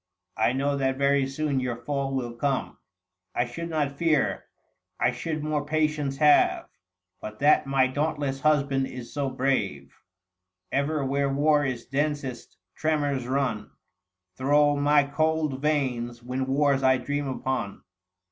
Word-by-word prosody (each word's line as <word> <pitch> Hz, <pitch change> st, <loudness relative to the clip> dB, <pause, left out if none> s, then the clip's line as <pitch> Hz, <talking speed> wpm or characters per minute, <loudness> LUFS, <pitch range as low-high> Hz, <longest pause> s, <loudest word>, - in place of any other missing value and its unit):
805 120 Hz, +3 st, +2 dB
1 -, -, -2 dB
know 140 Hz, +1 st, 0 dB
that 130 Hz, -1 st, 0 dB
very 140 Hz, 0 st, +2 dB
soon 140 Hz, 0 st, -1 dB
your 125 Hz, -2 st, -2 dB
fall 135 Hz, +2 st, -3 dB
will 120 Hz, -3 st, -3 dB
come; 135 Hz, +3 st, -2 dB, 0.6 s
I 120 Hz, -, +1 dB
should 170 Hz, +8 st, -6 dB
not 145 Hz, -3 st, -2 dB
fear, 160 Hz, -4 st, +1 dB, 0.5 s
I 125 Hz, -, +3 dB
should 155 Hz, +5 st, -4 dB
more 150 Hz, -1 st, -1 dB
patience 150 Hz, -2 st, -1 dB
have 150 Hz, 0 st, +4 dB, 0.5 s
But 110 Hz, 0 st, -8 dB
that 145 Hz, +1 st, +4 dB
my 135 Hz, -1 st, +3 dB
dauntless 145 Hz, 0 st, -2 dB
husband 140 Hz, -3 st, +2 dB
is 125 Hz, -2 st, -9 dB
so 140 Hz, -2 st, -1 dB
brave, 130 Hz, -, -1 dB, 0.8 s
Ever 140 Hz, +1 st, 0 dB
where 140 Hz, +1 st, 0 dB
war 145 Hz, +1 st, +3 dB
is 125 Hz, -4 st, -3 dB
densest: 145 Hz, -2 st, -3 dB, 0.2 s
tremors 145 Hz, -4 st, -1 dB
run 130 Hz, -5 st, -1 dB, 0.7 s
Thro' 145 Hz, +2 st, +3 dB
my 145 Hz, 0 st, +4 dB
cold 155 Hz, -1 st, 0 dB
veins 125 Hz, -6 st, -1 dB
when 130 Hz, +2 st, -3 dB
wars 140 Hz, 0 st, +2 dB
I 130 Hz, -1 st, +4 dB
dream 145 Hz, +3 st, -3 dB
upon." 130 Hz, -6 st, -3 dB
140 Hz, 140 wpm, -26 LUFS, 130-150 Hz, 0.8 s, have